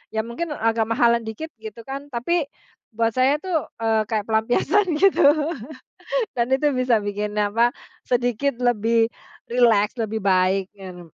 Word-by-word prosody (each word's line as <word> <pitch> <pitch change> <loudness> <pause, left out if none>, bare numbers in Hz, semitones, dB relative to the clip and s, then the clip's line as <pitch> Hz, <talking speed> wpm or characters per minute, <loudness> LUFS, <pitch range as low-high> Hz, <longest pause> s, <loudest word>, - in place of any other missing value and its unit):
Ya, 220 - 0
mungkin 295 +7 -5
agak 225 0 0
mahalan 235 0 +2
dikit, 315 +9 -6
gitu 220 +1 -9
kan, 275 +3 -7
tapi, 290 +5 -1 0.5
buat 230 0 +1
saya 255 +4 +3
tuh, 345 -5 -1 0.2
eee, 220 -1 +1
kayak 215 -2 -1
pelampiasan, 300 - +2
gitu. 370 -3 +4 1.1
Dan 240 0 -1
itu 280 +2 +2
bisa 255 -2 +2
bikin, 210 0 -4
apa, 210 +3 +2 0.4
sedikit 245 +2 0
lebih 230 -2 +2 0.4
rileks, 230 -4 +3
lebih 220 0 -2
baik, 190 +1 +2
gitu. 180 -4 -11
230 Hz, 140 wpm, -22 LUFS, 215-260 Hz, 1.1 s, gitu